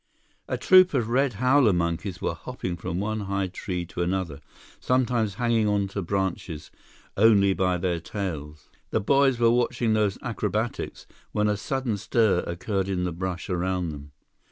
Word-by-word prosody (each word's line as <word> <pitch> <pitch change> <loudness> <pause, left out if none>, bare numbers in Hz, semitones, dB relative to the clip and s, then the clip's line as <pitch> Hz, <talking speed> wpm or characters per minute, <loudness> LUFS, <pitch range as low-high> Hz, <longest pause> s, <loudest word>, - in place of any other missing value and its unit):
A - - -2
troop 185 -3 +6
of 115 -4 0
red 130 +1 +2
howler 130 0 +4
monkeys 85 +2 -2
were - - -1
hopping 90 -2 -5
from 85 +1 -4
one 110 +2 -2
high 100 -1 -1
tree 90 -1 -4
to 90 +1 -5
another, 85 -4 -2 0.4
sometimes 120 -5 +1
hanging 115 -2 +1
on 100 -1 +1
to 100 +1 -3
branches 95 -4 -3 0.4
only 100 -2 +5
by 90 -1 +1
their 90 -1 -1
tails. 75 -5 -6 0.2
The - - +1
boys 135 +4 +3
were 115 -1 +4
watching 120 -1 +1
those 105 -3 +1
acrobatics, 110 -1 -3 0.3
when 105 0 +2
a 105 - +2
sudden 120 +1 -2
stir 105 -2 +2
occurred 95 +3 -2
in 90 -2 -1
the 90 - -1
brush 90 +1 -4
around 90 -1 -1
them. 75 0 -10
100 Hz, 160 wpm, -26 LUFS, 90-115 Hz, 0.4 s, troop